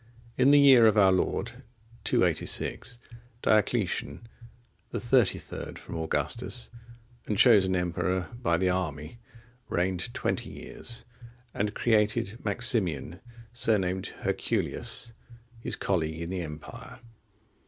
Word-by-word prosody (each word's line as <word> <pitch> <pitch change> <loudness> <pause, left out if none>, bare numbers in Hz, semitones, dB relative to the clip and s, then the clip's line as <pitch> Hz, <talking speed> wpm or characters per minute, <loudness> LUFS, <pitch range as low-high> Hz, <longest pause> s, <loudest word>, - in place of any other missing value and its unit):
In 130 - +4
the 145 - +7
year 130 -5 +7
of 110 0 +3
our 95 -2 +6
Lord 95 - -1 0.4
286,(46) 125 - +1 0.5
Diocletian, 110 +1 +1 0.6
the - - -3
thirty - - +3
third - - -8
from - - -9
Augustus, 80 -6 -2 0.6
and 105 - -1
chosen 100 -5 +5
emperor 90 +1 -1
by 85 -9 +2
the 95 +2 +1
army, 80 - -4 0.5
reigned 90 +5 -1
twenty - - -2
years, 120 -1 -7 0.5
and 105 +1 -2
created 110 0 +1
Maximian, 100 - 0 0.3
surnamed 95 -6 0
Herculius, 115 0 -2 0.5
his - - -2
colleague 80 -4 -1
in 85 +2 -5
the 95 -1 -2
empire. 75 -2 -9
95 Hz, 110 wpm, -28 LUFS, 90-115 Hz, 0.6 s, the